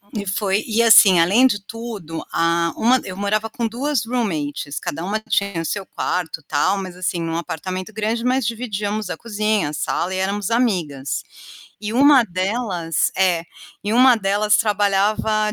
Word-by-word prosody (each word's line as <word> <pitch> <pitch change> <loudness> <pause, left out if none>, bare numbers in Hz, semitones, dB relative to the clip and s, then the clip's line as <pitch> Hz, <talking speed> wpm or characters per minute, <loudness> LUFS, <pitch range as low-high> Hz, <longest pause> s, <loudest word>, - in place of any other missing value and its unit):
e 200 - -3
foi 195 +1 0
e 225 0 +1
assim, 205 -5 +7
além 200 +10 +4
de 205 -5 -1
tudo, 215 -9 -7
a 170 0 +1
uma 250 +3 +3
eu 185 0 -7
morava 215 +2 -1
com 230 +1 -2
2, 250 +1 -2
roommates 155 - -3
cada 165 +3 -5
uma 205 +4 -2
tinha 200 -5 -1
o 165 - -5
seu 200 +2 -3
quarto, 170 -4 -3
tal 150 +6 +1
mas 185 -2 -6
assim 180 -1 -2
em 165 - -3
um 165 - -3
apartamento 185 +4 -5
grande 220 +2 -2
mas 255 -1 +1
dividíamos 215 -3 -3
a - - -4
cozinha, 215 -6 -1
a 150 - -7
sala 175 +4 -2
e - - -2
éramos 195 +1 -1
amigas. 175 - -1 0.6
E 210 0 -4
uma 275 0 +6
delas 185 -4 -1
é, 180 -3 +2 0.4
e 210 - -1
uma 255 +1 +6
delas 210 +1 +2
trabalhava 210 +1 +1
205 Hz, 170 wpm, -20 LUFS, 180-225 Hz, 0.6 s, assim